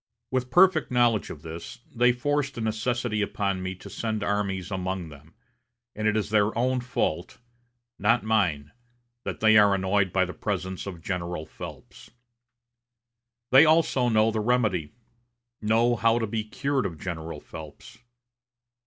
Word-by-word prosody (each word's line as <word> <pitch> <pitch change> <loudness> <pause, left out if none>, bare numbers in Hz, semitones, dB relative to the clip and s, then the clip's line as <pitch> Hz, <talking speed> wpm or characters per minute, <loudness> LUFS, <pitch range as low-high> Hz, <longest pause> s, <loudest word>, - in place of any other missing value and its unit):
With 130 -1 -1
perfect 175 -3 +4
knowledge 120 -4 +2
of 75 - -9
this, 80 +7 -8 0.2
they 125 +1 +4
forced 145 +3 -1
a - - -3
necessity 110 0 -1
upon 100 -2 -1
me 95 0 -4
to 95 - -12
send 110 -2 -3
armies 100 -2 -2
among 95 -2 -3
them, 75 +2 -15 0.6
and 110 0 -1
it 110 0 +2
is 105 -1 -2
their 110 0 +2
own 130 +2 +1
fault, 95 -9 -2 0.6
not 115 +4 +3
mine, 90 -10 0 0.5
that - - -5
they 110 0 +7
are 100 -1 +5
annoyed 95 0 +1
by 95 0 +2
the 90 - -7
presence 95 -2 -4
of 85 -4 -8
General 90 -4 -3
Phelps. - - -11 1.4
They 130 +4 +9
also 155 -6 +3
know 110 0 +3
the 110 - -2
remedy 105 -9 0 0.7
know 115 +3 +3
how 115 0 +3
to 115 - 0
be 110 0 -3
cured 130 +4 -1
of 85 -4 -9
General 80 -1 -6
Phelps. 80 +5 -11
105 Hz, 150 wpm, -26 LUFS, 95-120 Hz, 1.4 s, They